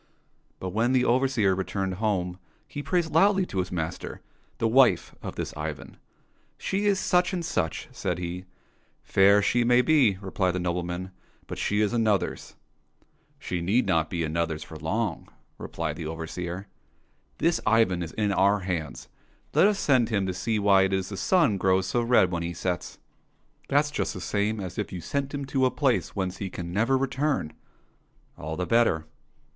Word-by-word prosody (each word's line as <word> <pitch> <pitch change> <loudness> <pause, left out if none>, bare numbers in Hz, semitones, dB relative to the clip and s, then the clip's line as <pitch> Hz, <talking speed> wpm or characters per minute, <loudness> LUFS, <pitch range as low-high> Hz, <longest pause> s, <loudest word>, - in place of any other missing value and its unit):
But 95 - -4
when 115 +6 +1
the 125 -1 +3
overseer 120 -6 +2
returned 95 0 -2
home 90 -4 -1 0.3
he 145 - -6
praised 165 0 -1
loudly 195 +3 +4
to 95 - -4
his 90 - -2
master 85 -1 -4 0.4
the 115 - +1
wife 125 +2 +4
of - - -6
this - - -4
Ivan. 75 -1 -6 0.3
*' - - -41 0.2
She 200 +2 -1
is 200 -2 +3
such 180 +1 +2
and 175 -2 -2
such," 80 - -2
said 90 - -3
he. 90 +1 -5 0.3
'' - - -39 0.3
Fair 100 +1 +5
she 120 +4 +2
may 125 +1 +4
be," 130 -8 +4
repHed 95 -1 -1
the 90 - -2
nobleman, 90 +1 -3 0.2
" - - -34
but - - -7
she 105 +1 +1
is 105 +1 +1
another's." 110 -5 0 0.3
— - - -40
" - - -39
She 90 -1 -2
need 100 +9 +2
not 80 -5 +1
be 85 -2 -2
another's 80 0 -2
for 80 - -12
long," 80 - -2 0.3
replied 80 -2 -4
the 80 -3 -5
overseer. 85 +3 -5 0.4
'* - - -40 0.3
This 170 0 +1
Ivan 105 -5 +3
is 80 -2 -5
in 105 -2 0
our 100 +1 +3
hands; 80 -8 -4 0.5
let - - +6
us 210 -1 +1
send 130 - +2
him 100 -4 0
to 95 - -2
see 110 +5 -1
why 100 -2 +5
it 95 0 +1
is 95 -1 -1
the 100 - -5
sun 140 - +2
grows 95 0 +2
so 120 +5 0
red 115 -6 +4
when 85 -1 -2
he 85 0 -3
sets." 90 +1 -3 0.2
— - - -42
" - - -35
That's 145 +2 +2
just - - -2
the - - -5
same 105 +3 -1
as 95 -1 -5
if 105 - -3
you 90 - -5
sent 140 - -3
him 145 -1 -4
to 135 -1 +2
a - - +1
place 130 0 0
whence 95 -2 -2
he 100 - -4
can 85 -1 -6
never 115 +7 +2
return." 135 - -1 0.3
— - - -40
" - - -38
All 80 0 -4
the 90 - -1
better." 115 -9 +2
100 Hz, 200 wpm, -26 LUFS, 90-125 Hz, 0.5 s, let